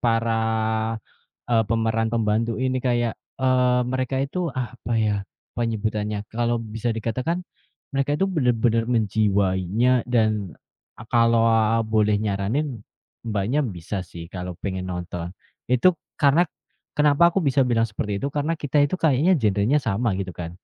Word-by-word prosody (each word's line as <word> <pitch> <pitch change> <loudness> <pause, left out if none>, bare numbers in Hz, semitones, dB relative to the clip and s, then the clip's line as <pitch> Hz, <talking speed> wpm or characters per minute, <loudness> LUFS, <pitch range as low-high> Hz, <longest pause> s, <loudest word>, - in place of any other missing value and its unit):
para 115 -1 +1 1.2
eee, 115 -1 +5
pemeran 115 0 +1
pembantu 115 0 +1
ini 130 +1 0
kayak, 120 -2 +1 0.3
eee, 125 -1 +3
mereka 130 0 -1
itu 140 +6 -5 0.2
apa 125 -1 -4
ya 110 -2 +2 0.4
penyebutannya. 105 -2 -2
Kalau 120 +1 0 0.2
bisa 115 +1 -2
dikatakan 130 - -2 0.5
mereka 140 +2 0
itu 190 - +2
benar-benar 115 -4 +2
menjiwainya 105 +1 +2
dan 110 -6 0 0.6
kalau 115 -1 +4 0.5
boleh 105 -1 +3
nyaranin, 110 +6 -1 0.4
Mbaknya 115 +6 0
bisa 95 - -4
sih 85 -1 -10
kalau 90 -1 -7
pengen 95 0 -3
nonton. 90 -1 -5 0.4
Itu 165 +9 +4 0.2
karena 145 +3 +5 0.5
kenapa 150 +3 +4
aku 195 - 0
bisa 140 -5 +2
bilang 115 -3 +2
seperti 105 -2 -3
itu? 140 - -2
Karena 155 +3 -1
kita 145 0 +2
itu 165 +6 0
kayaknya 160 +3 +3
genrenya 105 +5 +2
sama 115 -3 0
gitu 95 -2 -4
kan. 85 -1 -6
115 Hz, 130 wpm, -23 LUFS, 105-130 Hz, 1.2 s, eee